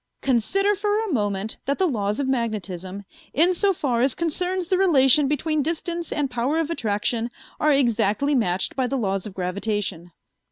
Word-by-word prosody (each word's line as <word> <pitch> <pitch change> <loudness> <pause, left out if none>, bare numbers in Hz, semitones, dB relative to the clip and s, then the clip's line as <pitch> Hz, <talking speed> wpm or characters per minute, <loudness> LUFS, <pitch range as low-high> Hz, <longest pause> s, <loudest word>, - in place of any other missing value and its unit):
"Consider 275 - +2
for 415 +1 0
a 440 -6 -2
moment 205 -2 -1
that 280 +1 0
the 380 - +2
laws 210 - -1
of 280 - -1
magnetism, 200 -6 -3 0.3
insofar 330 - +2
as 260 +1 +2
concerns 360 +2 -1
the 370 - +3
relation 295 -5 +5
between 300 +2 0
distance 335 +2 -3
and 290 -2 0
power 250 +4 -1
of 325 0 -1
attraction, 225 -2 -1 0.3
are 305 - +3
exactly 240 0 +2
matched 190 -8 0
by 260 -2 0
the 270 - -2
laws 195 -4 -1
of 195 - -10
gravitation." 185 -1 -3
265 Hz, 160 wpm, -23 LUFS, 210-325 Hz, 0.3 s, relation